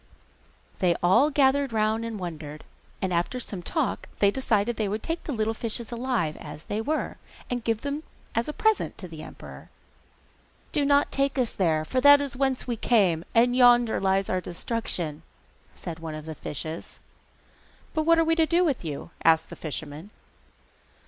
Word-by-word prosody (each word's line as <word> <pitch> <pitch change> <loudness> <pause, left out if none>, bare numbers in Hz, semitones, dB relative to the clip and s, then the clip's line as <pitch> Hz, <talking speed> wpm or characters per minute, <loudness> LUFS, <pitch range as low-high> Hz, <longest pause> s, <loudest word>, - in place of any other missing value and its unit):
They 180 -3 +3
all 230 +12 +5
gathered 275 -2 +3
round 220 +1 +1
and 230 -2 -4
wondered, 155 -5 -7 0.4
and 185 -1 0
after 175 +9 0
some 200 -6 -5
talk 260 - -2
they 200 -1 +4
decided 230 -2 +1
that - - -28
they 210 - +1
would 210 +2 -3
take 330 +1 -3
the - - -3
little 220 -3 0
fishes 230 +1 -4
alive 235 -10 -1
as 155 - -9
they 210 +1 -3
were, 310 +7 -2 0.3
and 245 -1 -2
give 225 -1 0
them 285 +1 -3 0.3
as 230 +1 0
a - - -2
present 440 +6 +1
to 185 - -6
the 160 -2 -9
emperor. - - -11 1.0
'Do 295 -3 +1
not 285 0 +3
take 275 0 0
us 250 -3 +1
there, 160 -4 +1
for 255 +9 0
that 285 +1 +8
is 280 -3 -2
whence 265 0 0
we 240 -2 -2
came, 195 -9 +3
and 245 +2 +4
yonder 245 -2 +5
lies 195 0 +2
our 185 0 0
destruction,' 175 -5 -3 0.5
said 170 -2 -7
one 160 -1 -6
of 155 0 -8
the 160 - -5
fishes. 155 +2 -6 0.9
'But 315 -1 -1
what 335 0 +6
are 330 - +4
we 325 - +3
to 320 -1 +4
do 345 +2 +3
with 280 - 0
you?' 155 +1 -6
asked 160 0 +4
the - - -6
fisherman. 155 +3 -6
225 Hz, 180 wpm, -26 LUFS, 170-265 Hz, 1.0 s, that